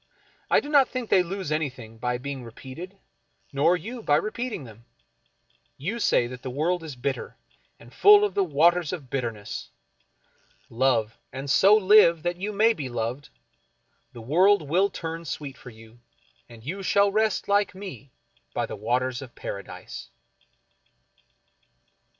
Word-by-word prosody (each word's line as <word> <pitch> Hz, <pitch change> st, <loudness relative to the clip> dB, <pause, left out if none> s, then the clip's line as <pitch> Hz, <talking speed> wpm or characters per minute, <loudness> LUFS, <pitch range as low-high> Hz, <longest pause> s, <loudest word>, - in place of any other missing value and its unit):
I -, -, +5 dB
do -, -, -9 dB
not 285 Hz, -4 st, +4 dB
think 255 Hz, -3 st, -5 dB
they 185 Hz, -, +6 dB
lose 180 Hz, -2 st, -4 dB
anything 130 Hz, -8 st, -4 dB
by 125 Hz, +1 st, -1 dB
being 135 Hz, 0 st, -6 dB
re 115 Hz, -, -9 dB
peated, 165 Hz, -, -10 dB, 0.6 s
nor 160 Hz, +6 st, +3 dB
you 230 Hz, +8 st, -7 dB
by 145 Hz, -8 st, +3 dB
repeating 215 Hz, -, -2 dB
them. 115 Hz, -1 st, -14 dB, 0.9 s
You 195 Hz, +12 st, -3 dB
say 125 Hz, -, +3 dB
that 125 Hz, +1 st, -8 dB
the 130 Hz, -, -5 dB
world 165 Hz, +7 st, 0 dB
is 155 Hz, -4 st, -8 dB
bitter, 130 Hz, +2 st, -4 dB, 0.4 s
and -, -, -16 dB
full 415 Hz, 0 st, +7 dB
of 410 Hz, -, -3 dB
the 200 Hz, -, +2 dB
Waters 170 Hz, +1 st, +3 dB
of 145 Hz, -8 st, -7 dB
Bitterness. 115 Hz, -6 st, -4 dB, 1.0 s
Love, 115 Hz, -3 st, +1 dB
and 135 Hz, +2 st, -6 dB
so 195 Hz, +7 st, +6 dB
live 190 Hz, -5 st, +5 dB
that 175 Hz, 0 st, -1 dB
you 210 Hz, +2 st, -2 dB
may 220 Hz, +3 st, +4 dB
be 140 Hz, -10 st, -5 dB
loved 120 Hz, +4 st, -4 dB, 0.4 s
— -, -, -45 dB
the 120 Hz, -, -9 dB
world 180 Hz, -, +4 dB
will 185 Hz, +7 st, +3 dB
turn 165 Hz, -2 st, -6 dB
sweet 140 Hz, -2 st, -6 dB
for 125 Hz, -, -12 dB
you, 115 Hz, 0 st, -16 dB, 0.5 s
and 115 Hz, -2 st, -14 dB
you 185 Hz, +10 st, -5 dB
shall 200 Hz, +1 st, +3 dB
rest 215 Hz, 0 st, +1 dB
like 200 Hz, -1 st, +2 dB
me 185 Hz, -8 st, -9 dB, 0.5 s
by -, -, 0 dB
the -, -, -7 dB
Waters 125 Hz, +4 st, -1 dB
of 130 Hz, -3 st, -11 dB
Paradise. 100 Hz, -1 st, -8 dB
155 Hz, 155 wpm, -26 LUFS, 125-195 Hz, 1.0 s, full